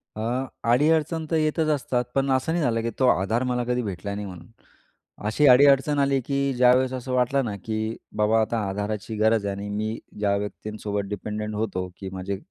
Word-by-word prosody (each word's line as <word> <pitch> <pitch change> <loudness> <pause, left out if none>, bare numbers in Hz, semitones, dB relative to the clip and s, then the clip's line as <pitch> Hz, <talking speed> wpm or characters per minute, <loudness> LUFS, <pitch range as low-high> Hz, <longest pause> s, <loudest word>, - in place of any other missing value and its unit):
अ, 110 - -5 0.5
अडी-अडचण 160 +4 +2
तर 165 - +1
येतच 155 +1 +1
असतात. 125 -3 -1
पण 135 0 +1
असं 130 +4 +1
नाही 170 -1 0
झालं 115 -3 +1
की 115 - -2
तो 130 - +4
आधार 110 +6 +1
मला 125 -1 0
कधी 125 +1 0
भेटला 100 -1 -4
नाही 105 0 -4
म्हणून. 90 -3 -10 0.8
अशी 145 +7 +3
अडी-अडचण 140 +2 +6
आली 140 -1 +2
की 140 -1 0
ज्यावेळेस 125 +1 +4
असं 130 0 -4
वाटलं 125 +2 +2
ना 105 -3 -3
की 110 0 -2 0.2
बाबा 110 +1 +3
आता 115 +2 -1
आधाराची 105 +2 -3
गरज 110 0 +2
आहे 100 -1 -2
आणि 100 +1 -6
मी 110 +2 -3 0.2
ज्या 100 -1 +2
व्यक्तींसोबत 105 0 -4
डिपेंडेंट 105 +1 -4
होतो 95 -4 -2
की 95 - -6
माझे 95 +1 -4
115 Hz, 185 wpm, -25 LUFS, 105-135 Hz, 0.8 s, अडी-अडचण